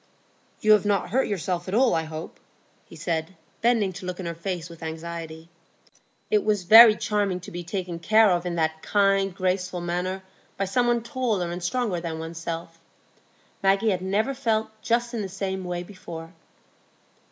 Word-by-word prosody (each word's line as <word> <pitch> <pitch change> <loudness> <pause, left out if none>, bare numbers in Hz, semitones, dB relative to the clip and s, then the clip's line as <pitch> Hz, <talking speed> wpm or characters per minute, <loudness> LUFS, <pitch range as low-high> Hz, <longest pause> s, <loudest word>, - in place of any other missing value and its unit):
"You 215 - +4
have 210 -2 +6
not 200 -3 0
hurt 265 +4 +2
yourself 180 -2 -2
at 190 - -2
all, 255 +1 +4
I 160 0 0
hope?" 155 0 -8 0.5
he - - -14
said, 165 +2 -3 0.3
bending 225 -5 +2
to 180 - -8
look 180 0 -5
in 185 - -5
her 170 - -3
face 170 0 -4
with 170 -1 -13
anxiety. 160 0 -6 0.8
It 210 -1 +3
was 210 -3 +1
very 220 +4 +9
charming 205 -4 -1
to - - -10
be 175 0 -5
taken 175 -1 -4
care 215 +3 +5
of 175 -1 +1
in 175 -1 -3
that 160 -1 -1
kind, 195 -1 +2
graceful 185 -1 -1
manner 180 +2 -3 0.3
by 195 - 0
some 240 +6 +1
one 240 -1 +1
taller 230 -9 -1
and 175 +1 -5
stronger 210 -1 -1
than 165 -2 -4
one's 165 +1 -6
self. 165 0 -6 0.8
Maggie 195 +3 +3
had 185 -2 -1
never 205 +8 0
felt 225 -4 0
just 235 +1 0
in 230 - -2
the 195 - -4
same 190 0 -3
way 175 0 -3
before. 165 -3 -9
185 Hz, 180 wpm, -25 LUFS, 170-210 Hz, 0.8 s, very